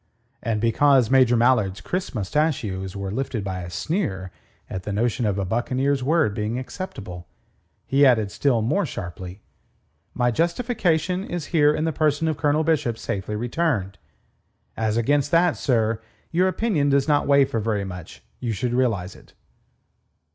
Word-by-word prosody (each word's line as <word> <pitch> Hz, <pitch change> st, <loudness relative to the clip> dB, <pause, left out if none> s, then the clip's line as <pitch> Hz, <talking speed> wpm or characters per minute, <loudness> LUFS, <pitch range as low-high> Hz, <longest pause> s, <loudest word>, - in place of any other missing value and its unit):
And 115 Hz, -3 st, -1 dB
because 125 Hz, +2 st, +3 dB
Major 130 Hz, -3 st, +5 dB
Mallard's 115 Hz, -5 st, +2 dB
crisp 185 Hz, -6 st, -4 dB
mostachios 105 Hz, -, -1 dB
were 100 Hz, -1 st, -4 dB
lifted 120 Hz, -2 st, -3 dB
by 95 Hz, -2 st, -4 dB
a 90 Hz, -, -7 dB
sneer 95 Hz, -, -2 dB, 0.4 s
at 95 Hz, -, -5 dB
the 105 Hz, -, -5 dB
notion 115 Hz, +2 st, 0 dB
of 100 Hz, -1 st, 0 dB
a 100 Hz, -, -1 dB
buccaneer's 130 Hz, +6 st, 0 dB
word 155 Hz, -5 st, +2 dB
being 105 Hz, +3 st, -2 dB
acceptable, 105 Hz, -, -7 dB, 0.6 s
he 140 Hz, +3 st, +3 dB
added 110 Hz, -7 st, +4 dB
still 125 Hz, -6 st, +1 dB
more 155 Hz, -, +1 dB
sharply: 90 Hz, -, -7 dB, 0.7 s
"My 125 Hz, -1 st, +2 dB
justification 180 Hz, -, 0 dB
is 175 Hz, -5 st, -4 dB
here 150 Hz, -3 st, +5 dB
in 155 Hz, -, -1 dB
the 160 Hz, 0 st, 0 dB
person 155 Hz, +1 st, +1 dB
of 155 Hz, -, 0 dB
Colonel 150 Hz, +1 st, +1 dB
Bishop 150 Hz, -8 st, 0 dB
safely 100 Hz, 0 st, -4 dB
returned. 115 Hz, -, -1 dB, 0.8 s
As 110 Hz, 0 st, 0 dB
against 145 Hz, +4 st, +2 dB
that, 170 Hz, +1 st, +3 dB
sir, 115 Hz, -4 st, 0 dB, 0.3 s
your 180 Hz, +3 st, +3 dB
opinion 185 Hz, -7 st, +1 dB
does 140 Hz, 0 st, +2 dB
not 145 Hz, -1 st, +2 dB
weigh 140 Hz, -1 st, +5 dB
for 115 Hz, -, -2 dB
very 105 Hz, -2 st, -1 dB
much. 90 Hz, -3 st, -9 dB, 0.2 s
You 120 Hz, -2 st, -2 dB
should 120 Hz, +4 st, -2 dB
realize 110 Hz, -8 st, 0 dB
it." -, -, -18 dB
125 Hz, 155 wpm, -23 LUFS, 105-150 Hz, 0.8 s, Major